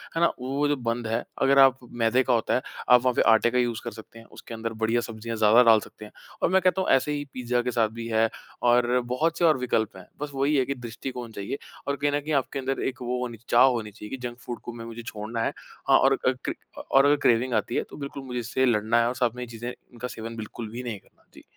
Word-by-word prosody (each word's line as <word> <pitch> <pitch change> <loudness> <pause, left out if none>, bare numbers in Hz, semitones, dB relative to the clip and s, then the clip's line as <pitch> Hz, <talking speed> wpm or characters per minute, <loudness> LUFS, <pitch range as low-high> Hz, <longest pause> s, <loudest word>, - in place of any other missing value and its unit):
है 165 - 0
ना, 170 - +6
वो 135 +3 -1
जो 145 - +2
बंद 115 -2 -3
है, 115 +2 -1 0.2
अगर 135 0 +5
आप 135 -1 +7 0.2
मैदे 120 +3 +3
का 125 - +1
होता 115 - +1
है, 130 - +1 0.3
आप 125 -1 +7
वहाँ 125 -1 +2
पे - - +3
आटे 110 +1 +4
का 125 - 0
यूज़ 120 -2 0
कर 120 - -4
सकते 115 +1 -12
हैं, 115 - -15
उसके 115 - -10
अंदर 115 0 -4
बढ़िया 115 +2 +2
सब्ज़ियाँ 115 0 -6
ज़्यादा 110 +3 +6
डाल 110 -2 +6
सकते 105 - -12
हैं। - - -13 0.3
और - - +3
मैं 190 0 +4
कहता 185 +1 +2
हूँ - - -1
ऐसे 135 +3 +3
ही 145 0 -2
पिज़्ज़ा 125 -1 0
के 125 - -2
साथ 115 -2 +2
भी 115 - -4
है, 115 0 +3 0.3
और 120 +1 +3
बहुत 165 +5 0
से 175 - +3
और 155 -4 +5
विकल्प 110 -6 -1
हैं। 95 - -12 0.2
बस 150 -1 -4
वही 140 +2 +1
है 130 - +3
कि 140 - -3
दृष्टिकोण 120 0 -7
चाहिए 100 +7 -5 0.3
और 140 - 0
कहीं 145 0 0
न 145 - +1
कहीं 155 +1 -3
आपके 135 - -6
अंदर 135 +1 -2
एक 130 -1 -5
वो 125 +1 -2
होनी 120 -2 -4
चाहिए 115 - -27
चाह 130 - +8
होनी 110 -4 -3
चाहिए 105 0 -10
कि - - -9
जंक 120 0 -10
फूड 120 - -5
को 120 - -7
म 115 -1 -8
मुझे 115 +1 -7
छोड़ना 115 +1 -5
है। - - -1 0.3
हाँ, - - +7
और 135 0 +4
अ, 130 - +5
क्रे - - -1 0.4
और 135 +1 +6
अगर 145 +1 +5
क्रेविंग 120 +2 +2
आती 110 +2 0
है, - - +1
तो - - -10
बिल्कुल 140 -1 -6
मुझे 125 -2 -4
इससे 125 +2 0
लड़ना 115 0 +2
है 115 - +2
और 125 - -2
साथ 120 -2 0
में 125 - -5
ये - - -7
चीज़ें 120 +1 -6
इनका 125 0 -9
सेवन 115 -1 -7
बिल्कुल 110 0 -7
भी 125 +2 -6
नहीं 110 -5 -5
करना। - - -30
जी। - - -15
120 Hz, 280 wpm, -26 LUFS, 115-130 Hz, 0.4 s, चाह